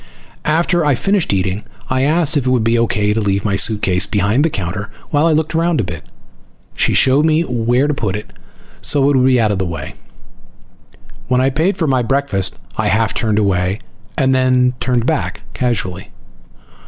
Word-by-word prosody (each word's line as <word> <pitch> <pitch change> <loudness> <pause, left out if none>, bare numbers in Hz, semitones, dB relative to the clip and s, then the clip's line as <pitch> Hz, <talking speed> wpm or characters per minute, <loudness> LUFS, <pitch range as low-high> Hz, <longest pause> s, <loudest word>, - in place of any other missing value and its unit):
After 170 +2 +1
I 145 -3 +2
finished 195 +6 0
eating 95 +1 -1 0.2
I 130 0 0
asked 155 +2 +1
if 135 -3 0
it - - +3
would 125 -3 +2
be 115 +1 +2
okay 105 -3 +1
to 110 - -1
leave 100 -1 -1
my 100 -2 +1
suitcase 100 -2 +2
behind 105 +5 +1
the 165 - +2
counter 100 - -4 0.2
while 150 +2 +2
I - - +3
looked 155 0 0
around 165 -1 +1
a - - +1
bit. 85 -2 -8 0.6
She - - 0
showed 135 +3 +4
me 160 +1 +2
where 125 0 0
to 150 - 0
put 105 -8 -2
it 105 - -8 0.5
so 145 -2 +4
it - - +1
would 130 - +3
be 130 -1 +3
out 110 -2 +2
of 100 - -2
the 95 - -1
way. 85 - -6 1.3
When 125 0 +2
I 130 +1 +2
paid 165 +8 0
for 165 - 0
my 130 -3 +1
breakfast 120 -7 0 0.2
I 110 - 0
half 110 +2 +1
turned 110 -3 0
away, 95 -2 0 0.4
then 130 -1 +2
turned 125 -2 0
back 155 0 -2
casually. 100 -6 -2
125 Hz, 190 wpm, -17 LUFS, 105-145 Hz, 1.3 s, showed